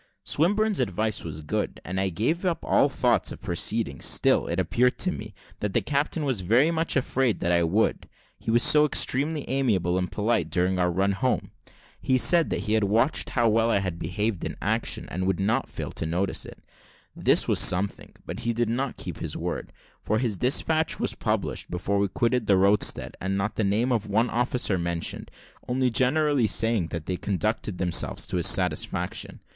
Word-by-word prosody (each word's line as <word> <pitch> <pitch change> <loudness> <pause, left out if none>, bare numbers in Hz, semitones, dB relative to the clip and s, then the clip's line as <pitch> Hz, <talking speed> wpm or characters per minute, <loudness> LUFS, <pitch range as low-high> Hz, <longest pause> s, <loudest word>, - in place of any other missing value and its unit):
Swinburne's 205 +4 +1
advice 110 -2 -1
was 80 -2 -7
good, 75 - -3
and 95 +2 -3
I 95 - 0
gave 120 - -1
up 180 -3 -1
all 140 - +3
thoughts 125 -3 +1
of - - -8
proceeding; 105 +4 -2
still, - - +2
it 85 +2 -2
appeared 120 +8 +1
to 185 - +1
me, 105 - -8 0.2
that 105 -2 -3
the - - +3
captain 145 +2 -1
was 130 -8 -1
very 120 - +3
much 165 0 0
afraid 130 -3 0
that 85 - +1
I 85 0 +3
would, 90 +7 0 0.3
he - - -6
was 120 +1 +4
so 150 0 +6
extremely 150 +1 0
amiable 100 -10 +1
and 90 - -3
polite 110 +2 0
during 90 +1 0
our 90 0 +2
run 95 +3 +1
home. 125 +6 -1 0.5
He 130 -1 +2
said, 170 +5 +4
that - - -2
he 105 - -2
had 110 -2 +2
watched 115 +8 +1
how 120 -2 +1
well 115 +1 +2
I 115 - +3
had 95 -4 -3
behaved 100 +3 -2
in - - -3
the - - -12
action, - - -1
and 95 +2 -2
would 95 -1 0
not 110 +7 0
fail - - -6
to - - -5
notice 90 +4 -2
it. - - -11 0.6
This - - +2
was - - +2
something, 95 +3 +1
but - - -6
he 115 - -1
did 120 0 0
not 130 +3 -2
keep - - -6
his - - -4
word; - - -4 0.3
for 110 - 0
his 115 -3 -1
despatch 155 - +1
was - - -1
published - - -2
before 95 +3 -1
we 100 - +2
quitted 115 +3 0
the 100 -3 +4
roadstead, 100 +2 +2
and 95 +1 -1
not 100 +2 -1
the 110 - 0
name 110 +6 +1
of 110 -3 0
one 110 +4 +1
officer 120 -5 0
mentioned, 85 -1 -3 0.4
only 125 0 +1
generally 135 0 +2
saying, 105 -1 0
that 85 -2 -6
they 90 - -2
conducted 105 0 -2
themselves 90 -2 +1
to - - -3
his - - +3
satisfaction. - - 0
110 Hz, 195 wpm, -25 LUFS, 95-130 Hz, 0.6 s, so